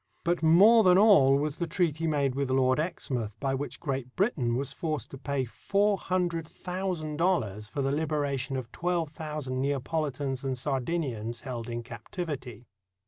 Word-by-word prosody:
But 170 0 +1
more 195 +9 +7
than 180 -1 +6
all 150 -11 +6
was 150 +1 -2
the 170 - -2
treaty 165 -1 0
made 140 -4 +1
with 140 0 -1
Lord 130 +1 +3
Exmouth 125 - -3
by 135 -1 0
which 140 +2 -4
Great 135 -4 -4
Britain 150 - +1
was 135 +1 -3
forced 155 -5 -3
to 135 - -7
pay 140 -1 -1
four 200 - +1
hundred 175 -4 -1
thousand 180 -5 -4
dollars 110 - 0
for 140 +8 -2
the 135 - +1
liberation 145 -3 -1
of 125 -3 -6
twelve 175 -3 -1
thousand 150 -4 -4
Neapolitans 140 -1 -2
and 135 -1 -2
Sardinians 130 -4 -2
held 120 -3 -5
in 120 0 -4
captivity. 125 - -6
145 Hz, 160 wpm, -28 LUFS, 130-165 Hz, -, more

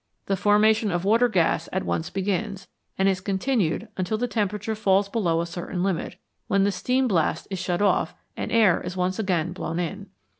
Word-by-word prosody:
The 195 - 0
formation 210 +2 +3
of 175 0 -1
water 230 +4 +4
gas 175 -7 +1
at 190 - -2
once 160 - -2
begins, 195 0 -2 0.3
and 190 - +3
is 190 -2 +1
con 195 0 -1
tinued 215 -4 0
until 185 +3 -1
the 245 +2 -1
temperature 210 -1 -1
falls 200 -2 +2
below 175 -7 0
a - - -2
certain 175 +1 -4
limit, 185 -2 -2 0.3
when 195 -1 +2
the 200 - +2
steam 255 +6 +1
blast 165 -6 +1
is 190 - -3
shut 180 +2 -1
off 180 -3 +1 0.2
and - - -4
air 215 -6 +4
is 185 - -6
once 185 +2 -1
again 175 -5 0
blown 165 -2 -4
in. 195 +4 -4
195 Hz, 195 wpm, -25 LUFS, 180-210 Hz, 0.3 s, water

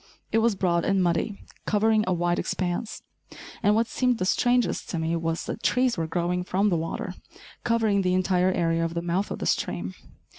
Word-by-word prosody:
It 225 - +3
was 225 -2 +2
broad 175 -3 +1
and 195 -1 +2
muddy, 175 +4 -1 0.2
covering 215 +1 +3
a 185 - +2
wide 175 0 0
expanse, 185 +4 -3 0.6
and 205 +1 +3
what 225 +1 +3
seemed 250 +1 0
the 185 - -1
strangest 245 +4 +1
to 170 - -2
me 160 +1 -1
was 165 0 -2
that - - -5
trees 250 +1 +2
were 165 -2 -2
growing 175 +2 -1
from 195 +3 +1
the 180 - +1
water, 165 0 -3 0.5
covering 220 -4 +2
the 185 -1 +1
entire 185 0 +2
area 165 -2 +1
of 165 0 -3
the 170 - -2
mouth 175 +4 -1
of - - -4
the - - -4
stream. 90 +1 -1
185 Hz, 195 wpm, -26 LUFS, 170-215 Hz, 0.6 s, It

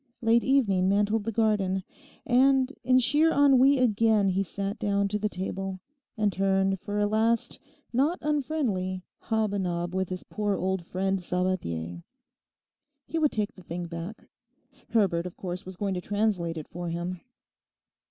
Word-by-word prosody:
Late 230 +1 +4
evening 200 -9 +3
mantled 205 +2 +1
the 225 - -1
garden; 205 -4 +1 0.4
and 265 +2 +3
in 255 +1 +4
sheer 295 +6 +3
ennui 275 -1 +5
again 220 -4 +3
he 190 +1 +1
sat 200 +3 -4
down 200 -1 +1
to 210 +1 -1
the 210 0 0
table, 190 0 -4 0.4
and 210 -2 +1
turned 195 0 +1
for 205 +3 -4
a 205 - +2
last 220 +2 +1 0.3
not 290 +8 +2
unfriendly 255 - -1 0.2
hob 220 -2 -1
a 200 - 0
nob 175 -1 -2
with 190 -1 -1
his 185 -1 -5
poor 205 -2 -2
old 190 -1 -1
friend 190 +2 -1
Sabathier. 170 - -2 1.0
He 330 - -2
would 300 -2 +3
take 215 +1 -2
the 185 - -14
thing 175 0 -5
back. 170 +5 -7 0.6
Herbert, 185 -6 +2
of 180 - -11
course, 180 0 -6
was 185 - -7
going 200 -1 -1
to 180 - -3
translate 200 -4 -1
it 155 - -6
for 175 0 -5
him. 175 +2 -4
200 Hz, 160 wpm, -27 LUFS, 185-225 Hz, 1.0 s, ennui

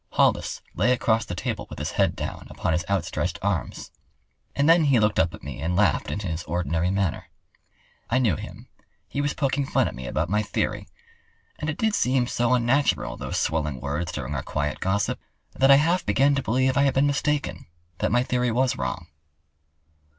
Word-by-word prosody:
Hollis - - +1
lay 125 - +3
across 115 -2 +1
the 90 - -5
table - - -3
with - - -8
his - - -3
head - - +1
down - - -5
upon 90 - -2
his 85 +3 0
outstretched 100 -2 -1
arms. - - -2 0.6
And 140 +1 +2
then 165 -1 +6
he 135 -5 +4
looked 105 -1 +2
up 85 +1 +3
at - - -16
me 70 -2 -7
and 85 +3 -1
laughed - - +2
in - - -3
his 85 -4 -3
ordinary 85 0 -1
manner. 95 -3 -1 0.8
I 115 - +2
knew 115 - +2
him—he 140 - -9
was 145 0 -1
poking 140 0 0
fun - - +2
at - - -5
me 65 -1 -7
about 80 +6 -1
my 105 +4 +1
theory. 105 - -2 0.7
And 150 - -2
it 155 - -3
did 220 -1 +1
seem 130 -10 +2
so 120 0 +1
unnatural, 125 +4 +1
those - - -4
swelling 75 -4 -1
words 75 +6 -3
during 75 -4 -4
our 70 - -2
quiet 75 -1 -3
gossip, 100 +2 0 0.3
that 135 +1 +3
I 140 - +10
half 165 +6 +2
began 135 +8 +3
to 140 - 0
believe 130 +2 +1
I - - +5
had 140 -1 +2
been 135 +2 +4
mistaken—that 120 - -2
my 120 +2 +3
theory 125 -1 0
was 125 +2 +1
wrong. 90 -3 -3
110 Hz, 190 wpm, -25 LUFS, 85-135 Hz, 0.8 s, I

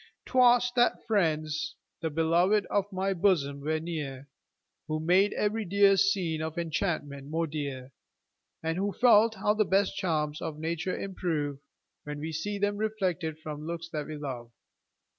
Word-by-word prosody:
'Twas 245 -1 +4
that 240 -1 +2
friends, 155 -6 0 0.3
the 165 - -1
beloved 170 +6 +2
of 205 0 0
my 190 +1 0
bosom, 165 -7 +1
were 155 +2 0
near, 145 -5 -5 0.6
Who 155 0 -1
made 185 +6 +3
every 215 +2 0
dear 200 +1 +4
scene 185 -5 +1
of 160 +1 -4
enchantment 155 -4 -2
more 165 +2 0
dear, 140 -4 -5 0.7
And 165 +2 -1
who 200 0 -1
felt 230 -2 +5
how 210 - +1
the 215 0 +2
best 195 0 +1
charms 155 -5 -1
of 160 -2 -4
nature 165 +3 -2
improve, 155 -7 -2 0.4
When 150 0 -6
we 155 +2 -4
see 180 +7 -3
them 205 0 0
reflected 185 -7 -1
from 150 0 -6
looks 170 0 -5
that 150 -3 -4
we 155 - -6
love. 130 -5 -6
165 Hz, 155 wpm, -29 LUFS, 155-200 Hz, 0.7 s, felt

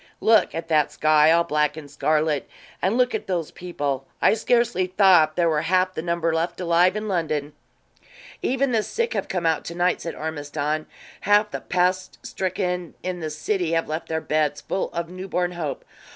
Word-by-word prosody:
Look 220 -1 +3
at 165 - -4
that 155 -2 +2
sky, 155 0 +4
all 170 +1 +4
black 150 -1 0
and 155 - -7
scarlet; 150 +1 0 0.3
and 195 +6 +1
look 250 0 +2
at - - -3
those 175 -5 -2
people 145 -7 -4
I - - +4
scarcely 230 -4 +1
thought 180 -5 +5
there 175 -1 +2
were 155 -2 +1
half 185 +2 +1
the 160 - -4
number 170 -1 0
left 170 +2 -1
alive 175 +1 +3
in 215 0 -3
London." 155 -6 -1 0.9
"Even 265 +1 +1
the 225 -2 +2
sick 465 - -2
have - - -2
come 180 -3 -2
out 160 -1 +1
to 170 - -6
night," 180 +1 +1
said 165 - -5
Ormiston. 155 0 -3 0.3
"Half 205 +1 +3
the - - -5
pest 185 +1 0
stricken 180 -2 -3
in 180 -1 -3
the 160 -2 -4
city 165 +3 -1
have 165 0 +1
left 155 +2 -4
their 160 0 -1
beds, 155 -1 0
full 190 - -3
of 170 0 -3
newborn 180 -1 -2
hope. 165 -5 -5
170 Hz, 185 wpm, -23 LUFS, 155-185 Hz, 0.9 s, thought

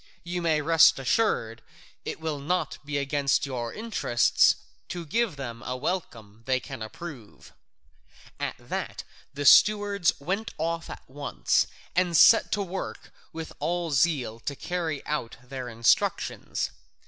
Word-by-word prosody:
You 175 0 -3
may 160 -3 +2
rest 165 +1 +6
assured 125 - 0 0.4
it - - -4
will 160 -2 -3
not 180 +6 -1
be 145 0 -3
against 140 0 +1
your 120 -4 -4
interests 215 - +2 0.3
to 175 -1 -5
give 225 +3 0
them 120 -4 -6
a 125 +1 -4
welcome 115 - -4
they 130 -1 +2
can 130 -1 -9
approve." 120 0 -9 0.9
At - - -2
that - - -5 0.3
the 145 0 -3
stewards 205 -2 +6
went 195 +10 -3
off 165 +1 -2
at - - -9
once 140 +2 0 0.3
and 175 -2 +2
set 225 - +7
to 205 - 0
work 190 0 -6 0.2
with 160 0 -7
all 175 -1 -1
zeal 135 -6 +1
to 140 +4 -4
carry 165 -3 -3
out 150 -6 -3
their 125 -1 -6
instructions. 115 0 0
150 Hz, 135 wpm, -27 LUFS, 130-175 Hz, 0.9 s, set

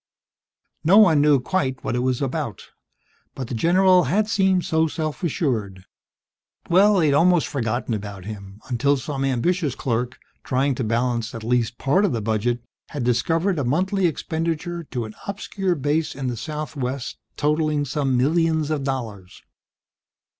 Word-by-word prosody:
No 180 +6 +5
one 170 -9 +6
knew 145 -2 +5
quite 130 -3 -2
what - - -2
it - - 0
was 130 +1 0
about, 135 - -4 0.7
but 130 -3 -5
the - - -4
general 180 +6 +4
had 205 +9 +1
seemed 190 -4 +2
so 160 0 +2
self 155 -1 -4
assured 110 - -2 0.8
that - - -13
Well, 200 +4 +6
they'd 155 -5 +3
almost 170 +3 +4
forgotten 120 -3 -2
about 100 -3 -6
him 100 -1 -9
until 135 +3 +1
some 135 +1 -4
ambitious 135 +3 0
clerk, 125 0 -2 0.3
trying 135 +2 +1
to 125 - -3
balance 115 +1 -1
at 115 - -7
least 120 0 0
part 145 +9 +2
of 200 - +1
the 115 - -1
budget, 115 +3 -1 0.3
had 145 -4 -4
discovered 165 +9 +1
a - - 0
monthly 185 +8 +1
expenditure 165 +1 -3
to 125 -5 -4
an 110 - -9
obscure 195 -2 -2
base 150 +2 -1
in 135 0 -5
the 120 - -3
southwest 140 -3 -4 0.2
totalling 150 0 +1
some 135 -2 0
millions 160 +2 +1
of 150 -3 -1
dollars. 115 -9 -5
140 Hz, 155 wpm, -23 LUFS, 120-165 Hz, 0.8 s, one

